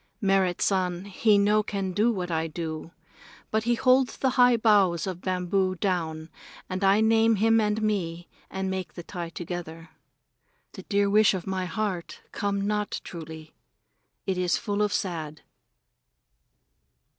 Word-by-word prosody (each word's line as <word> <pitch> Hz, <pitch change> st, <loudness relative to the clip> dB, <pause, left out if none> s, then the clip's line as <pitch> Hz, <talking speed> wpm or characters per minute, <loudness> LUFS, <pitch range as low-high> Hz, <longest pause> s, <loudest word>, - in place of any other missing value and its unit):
Merrit 195 Hz, -3 st, +1 dB
San 185 Hz, -2 st, 0 dB
he 205 Hz, +2 st, +2 dB
no 210 Hz, +1 st, +3 dB
can 195 Hz, -3 st, -3 dB
know 215 Hz, +4 st, +3 dB
what 185 Hz, -6 st, -2 dB
I 160 Hz, 0 st, 0 dB
do, 160 Hz, 0 st, -5 dB, 0.6 s
but 220 Hz, 0 st, 0 dB
he 240 Hz, 0 st, +2 dB
hold 255 Hz, +1 st, +4 dB
the 265 Hz, 0 st, -1 dB
high 245 Hz, -1 st, +5 dB
boughs 200 Hz, -6 st, +3 dB
of 185 Hz, -2 st, -5 dB
bamboo 185 Hz, 0 st, 0 dB
down 165 Hz, -4 st, -2 dB, 0.4 s
and 185 Hz, +1 st, -4 dB
I 195 Hz, +2 st, +4 dB
name 225 Hz, 0 st, +4 dB
him 225 Hz, +2 st, +3 dB
and 210 Hz, 0 st, 0 dB
me 175 Hz, -5 st, -2 dB, 0.2 s
and 190 Hz, 0 st, -3 dB
make 190 Hz, -1 st, -4 dB
the 175 Hz, -, -7 dB
tie 175 Hz, -1 st, -6 dB
together. 165 Hz, -1 st, -7 dB, 0.8 s
The -, -, -9 dB
dear 200 Hz, 0 st, +1 dB
wish 210 Hz, 0 st, +4 dB
of 180 Hz, -, -5 dB
my 190 Hz, -1 st, -2 dB
heart 185 Hz, -1 st, -4 dB
come 200 Hz, -1 st, -2 dB
not 210 Hz, -1 st, -1 dB
truly. 160 Hz, -2 st, -9 dB, 0.7 s
It 190 Hz, -1 st, -1 dB
is 180 Hz, -1 st, +1 dB
full 205 Hz, -2 st, -2 dB
of 210 Hz, -1 st, +1 dB
sad. 160 Hz, -5 st, -3 dB
190 Hz, 150 wpm, -26 LUFS, 175-210 Hz, 0.8 s, high